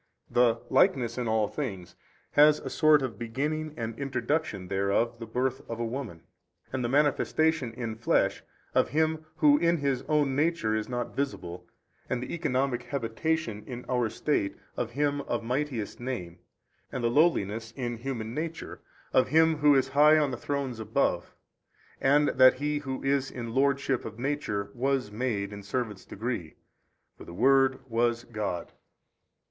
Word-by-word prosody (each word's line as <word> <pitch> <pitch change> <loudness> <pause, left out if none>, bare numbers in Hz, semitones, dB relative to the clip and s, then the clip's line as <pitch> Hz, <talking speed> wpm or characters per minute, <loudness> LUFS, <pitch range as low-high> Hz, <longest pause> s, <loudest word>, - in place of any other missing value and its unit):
The 120 -2 +3
likeness 125 - +3
in 120 - -2
all 110 -1 +2
things 100 -12 -5 0.4
has 150 +1 +6
as - - -13
a - - -2
sort 155 -3 +5
of 115 -6 -4
beginning 150 +6 -3
and 115 -1 -4
introduction 130 - -2
thereof 100 +5 0
the 115 - -7
birth 130 +3 -1
of 115 0 -4
a 120 - -1
woman, 115 -8 -5 0.5
and 130 -1 -1
the 120 - -1
manifestation 145 0 +2
in 115 -2 -4
flesh 115 - +1 0.3
of - - +3
Him 160 +1 +1
Who 145 -3 +5
in 170 +1 +3
His 140 -4 0
own 145 -3 +2
Nature 150 -7 +1
is 110 +1 -2
not 120 -1 -3
visible, 90 -11 -4 0.4
and 125 - 0
the - - -6
economic 135 -6 0
habitation 120 -2 -2
in 125 -1 -7
our 125 -2 +1
estate 110 -2 -1 0.2
of 120 - -2
Him 145 +1 0
of 120 -1 -1
mightiest 125 -3 -2
Name, 120 -9 -5 0.5
and 125 - -4
the - - +3
lowliness 115 - +2
in 120 -3 -3
human 115 -2 -4
nature 165 +3 -5 0.3
of 130 - +4
Him 160 0 +4
Who 145 -1 +5
is 135 -1 +2
high 150 +3 +6
on 145 -3 +2
the - - -2
Thrones 135 -3 -3
above, 110 -5 -1 0.7
and 145 +2 +4
that 130 0 +6
He 145 +2 -1
Who 135 -2 -5
is 135 -1 +1
in 115 -2 -6
Lordship 135 -1 +1
of 110 -1 -8
Nature 120 -7 -2
WAS 130 -3 0
MADE 105 -3 -2
in 100 - -7
servants' 105 0 -4
degree: 105 -7 -4 0.6
for - - -9
the 85 - -10
Word 135 +2 +3
was 120 0 +1
God. 105 -7 -4
130 Hz, 165 wpm, -28 LUFS, 115-145 Hz, 0.7 s, has